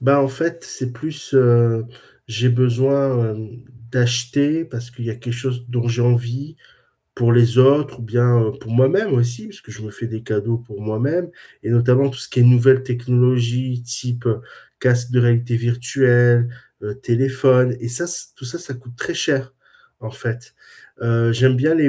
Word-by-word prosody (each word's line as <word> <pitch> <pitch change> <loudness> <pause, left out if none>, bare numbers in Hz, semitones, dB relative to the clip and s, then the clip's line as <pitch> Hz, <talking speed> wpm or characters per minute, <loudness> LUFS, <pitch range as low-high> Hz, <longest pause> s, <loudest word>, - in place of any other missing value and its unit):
Bah, 140 +2 +4
en 135 - +2
fait, 165 +5 -4
c'est 130 -2 -6
plus, 145 +4 -7
heu, 120 -3 +4 0.4
j'ai 115 +1 0
besoin, 130 0 +2
hem, 110 0 -8 0.4
d'acheter 125 +6 0
parce 120 -5 -9
qu'il 120 -1 -9
y 115 - -3
a - - -5
quelque 120 0 -6
chose 125 -1 -5
dont 120 -1 -2
j'ai 120 +1 0
envie 120 +5 -1 0.6
pour 120 -1 +2
les 120 0 +4
autres 140 +1 +4
ou - - -10
bien, 120 +1 +2
heu, 110 -1 0
pour 110 - -10
moi-même 135 - +2
aussi 120 - -1
puisque 200 - -15
je 110 0 -11
me 110 - -8
fais 115 +3 -7
des 110 -1 -7
cadeaux 110 +1 -2
pour 110 -4 -12
moi-même. 135 +12 -2 0.3
Et - - -4
notamment 125 +3 +3
tout 130 - -9
ce - - -5
qui 125 - -2
est - - +7
nouvelles 125 +2 +6
technologies, 125 0 0
type 120 0 -4 0.5
casque 120 -1 +1
de 125 - +3
réalité 120 0 +2
virtuelle, 120 0 +2 0.3
heu, 105 0 -6
téléphone 130 0 +2
et 115 - -6
ça, 120 +8 -2
se 175 - -5
tout 130 - -10
ça, 125 - -4
ça 155 -6 -9
coûte 125 -1 -13
très - - -4
cher, 140 -6 -1 0.5
en 110 - -8
fait. 120 +1 -6 0.5
Heu, 115 0 +1
j'aime 130 +3 +3
bien 150 +6 +2
les 160 - +2
125 Hz, 180 wpm, -19 LUFS, 120-130 Hz, 0.6 s, est